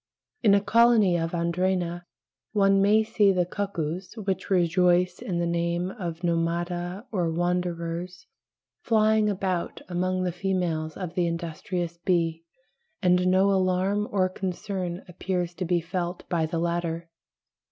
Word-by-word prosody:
In 205 -4 +5
a 200 - +3
colony 230 -4 +4
of 165 -1 0
Andrena 175 0 -1 0.5
one 195 -2 +4
may 210 +2 +4
see 210 -2 +3
the 180 -2 +1
cuckoos 180 -2 -4
(which 190 -3 -3
rejoice 180 0 +3
in 180 - -3
the 170 - 0
name 170 +1 -1
of 175 -5 -6
Nomada 175 +3 -1
or 180 -6 0
wanderers) 175 0 -2 0.6
flying 215 -1 +3
about 185 -3 -2
among 185 +1 -1
the 180 - 0
females 175 -4 -2
of 180 -3 -5
the 175 -2 +1
industrious 170 +1 -4
bee, 165 -2 0 0.6
and 180 0 +4
no 190 +2 +4
alarm 190 +2 +1
or 190 -2 +2
concern 185 -1 -4
appears 180 0 -3
to 180 +1 -4
be 175 0 +2
felt 175 +1 -4
by 165 -2 +1
the 165 +1 -3
latter. 170 0 -2
180 Hz, 135 wpm, -26 LUFS, 170-190 Hz, 0.6 s, In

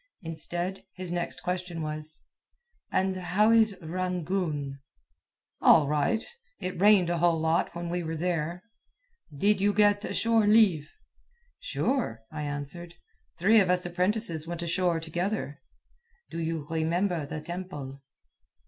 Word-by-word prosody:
Instead, 175 +3 -4
his 185 -2 -6
next 135 -7 -3
question 180 -2 -3
was: 155 0 -5 0.7
"And 190 0 +1
how 185 +4 +2
is 220 -3 +4
Rangoon?" 170 -5 -2 0.8
"All 155 -3 +6
right. 150 +10 +1 0.4
It 185 -2 -4
rained 200 -4 +6
a 170 - 0
whole 170 -1 +3
lot 160 +1 +1
when 170 0 -4
we 175 +1 -2
were 160 -1 -4
there." 170 +1 -2 0.7
"Did 195 +7 +2
you 205 +1 +3
get 205 0 +2
shore 225 -2 +3
leave?" 200 -9 +4 0.7
"Sure," 255 - -1
I 155 -1 -5
answered. 145 +4 -4 0.4
"Three 215 +6 +5
of 190 -3 +2
us 180 0 +2
apprentices 175 -2 0
went 170 0 -4
ashore 170 0 +1
together." 165 -1 -3 0.7
"Do 165 - -4
you 160 -2 -2
remember 165 0 0
the 155 - -5
temple?" 150 -5 -7
175 Hz, 130 wpm, -28 LUFS, 160-190 Hz, 0.8 s, All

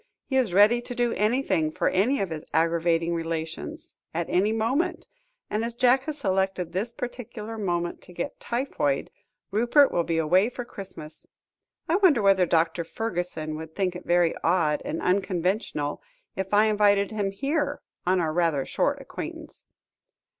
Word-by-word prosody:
He 265 - -3
is 255 -7 +2
ready 210 +6 +5
to 245 0 -7
do 240 -1 +1
any 235 +6 +1
thing 155 - +1
for - - -1
any 235 +9 +2
of 190 -4 -2
his 155 -1 -5
aggravating 165 +1 +2
relations, 165 -1 -4 0.2
at 170 0 0
any 195 +4 +3
moment, 230 +9 0 0.4
and 215 +2 -1
as 235 0 -4
Jack 255 +2 +3
has 310 -1 -3
selected 190 - 0
this 200 +7 -2
particular 235 -2 -6
moment 175 -5 -2
to - - -15
get 175 -1 -5
typhoid, 235 - -1 0.4
Rupert 240 +7 +4
will 170 - +1
be 165 -1 -1
away 180 +7 +3
for 245 0 -6
Christmas. 185 -8 -9 0.6
I 335 - +3
wonder 370 - +5
whether 195 -2 +4
Dr. 165 +1 +1
Fergusson 175 -6 -3
would 160 0 -9
think 185 -3 0
it 180 - -9
very 175 -1 +3
odd 165 -3 +2
and 160 - -4
unconventional, 180 -5 0 0.3
if 190 0 -4
I 210 +1 +5
invited 205 -1 +3
him 205 -2 -1
here, 285 +7 -2 0.2
on 185 +1 +2
our 160 -3 0
rather 165 -5 +1
short - - 0
acquaintance?" - - -8
190 Hz, 160 wpm, -26 LUFS, 170-230 Hz, 0.6 s, ready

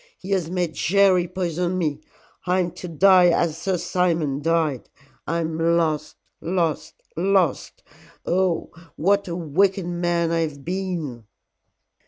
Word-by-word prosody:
He 190 - -8
has 180 -5 0
made 175 -2 -2
Jerry 185 -1 +3
poison 180 0 -2
me. 155 -4 -2 0.5
I 180 +1 +2
am 175 -1 -2
to 180 - -8
die 180 +2 +5
as 170 -2 +2
Sir 180 +3 -1
Simon 165 -6 0
died. 160 -4 0 0.4
I 170 +2 0
am 160 0 -3
lost 165 -2 +1 0.3
lost 170 -3 -1 0.2
lost. 185 -3 0 0.4
Oh, 180 -1 0 0.2
what 200 +5 +1
a 170 - -4
wicked 180 +3 +1
man 175 -1 0
I 165 - +1
have 150 -4 -3
been." 170 - -4
170 Hz, 135 wpm, -23 LUFS, 160-185 Hz, 0.5 s, die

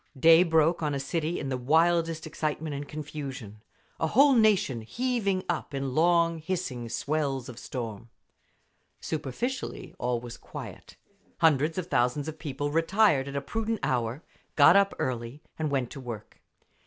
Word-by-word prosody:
Day 165 +3 +7
broke 165 -1 +3
on 150 -2 0
a - - -2
city 160 +4 -2
in 135 - -4
the 130 -1 -2
wildest 165 +3 +2
excitement 155 0 -3
and 140 +1 -5
confusion, 135 -8 -7 0.4
a 160 - +1
whole 275 - +5
nation 210 - +3
heaving 210 - -1
up 155 -4 -3
in 135 -1 -2
long 170 +1 +3
hissing 155 -9 -4
swells 135 0 -1
of 120 -1 -9
storm. 115 -3 -6 0.9
Superficially 160 - -4
all 120 -1 0
was 120 0 -9
quiet; - - -10 0.4
hundreds 155 +1 +3
of 185 - -1
thousands 130 -2 0
of 155 0 -6
people 145 -1 -3
retired 165 -3 +3
at 140 - -6
a 140 - -1
prudent 225 +6 -2
hour, 125 +3 -1 0.3
got 150 +4 +7
up 200 0 +4
early, 120 +3 -4 0.2
and 155 -1 0
went 135 -4 -1
to 140 - -8
work. 120 -5 -8
150 Hz, 155 wpm, -28 LUFS, 130-170 Hz, 0.9 s, Day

